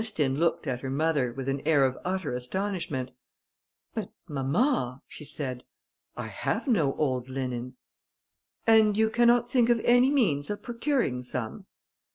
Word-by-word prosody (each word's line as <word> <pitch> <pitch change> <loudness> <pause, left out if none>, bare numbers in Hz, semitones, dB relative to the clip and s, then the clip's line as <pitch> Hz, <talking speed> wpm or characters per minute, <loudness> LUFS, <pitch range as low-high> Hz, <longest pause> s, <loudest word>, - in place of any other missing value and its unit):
Ernestine 150 -11 0
looked 170 -1 +1
at 130 -4 -2
her 135 - -4
mother, 140 -2 +1
with 135 +2 -6
an 135 0 -1
air 145 -3 +4
of 130 -1 0
utter 185 -6 -2
astonishment. 135 -1 -3 0.8
"But, - - -4 0.2
mamma," 140 - 0
she - - -10
said, 130 -4 -4 0.5
"I - - -4
have - - -2
no 165 - +2
old 130 -4 -1
linen." 125 -2 -4 0.9
"And 220 -2 +5
you 220 0 +3
cannot 240 +1 +4
think 245 -2 +3
of 240 -1 +4
any 245 +2 +5
means 200 - +1
of 205 - -4
procuring 235 - -1
some?" 125 - -5
150 Hz, 150 wpm, -28 LUFS, -, 0.9 s, And